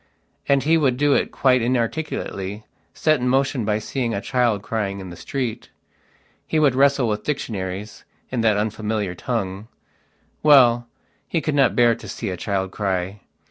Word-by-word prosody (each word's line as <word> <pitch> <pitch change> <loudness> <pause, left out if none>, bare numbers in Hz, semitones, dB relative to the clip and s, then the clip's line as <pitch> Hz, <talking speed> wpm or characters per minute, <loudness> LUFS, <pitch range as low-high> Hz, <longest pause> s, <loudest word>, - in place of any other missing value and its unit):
And 140 -2 +4
he 165 +3 +3
would 130 -5 +2
do 145 +1 +3
it - - +1
quite 130 -2 +3
inarticulately, 115 -5 -2 0.3
set 155 -3 +2
in 125 0 0
motion 135 -2 +1
by 105 0 +1
seeing 115 +1 -2
a - - -1
child 120 -3 0
crying 100 -3 -2
in 95 -2 -8
the - - -8
street. 125 +2 -4 0.8
He 160 - 0
would 150 -4 +4
wrestle 135 -1 +3
with 105 -1 -2
dictionaries, 105 -7 -4 0.3
in 125 -2 -1
that 110 -2 +3
unfamiliar 105 -2 -2
tongue.... 100 0 -3 0.7
Well, 120 -5 +6 0.4
he 165 - 0
could 155 0 -2
not 135 -3 +3
bear 120 -1 +5
to - - -9
see 110 -5 -4
a - - -3
child 95 +1 -2
cry. 95 -1 -2
115 Hz, 165 wpm, -22 LUFS, 105-135 Hz, 0.8 s, Well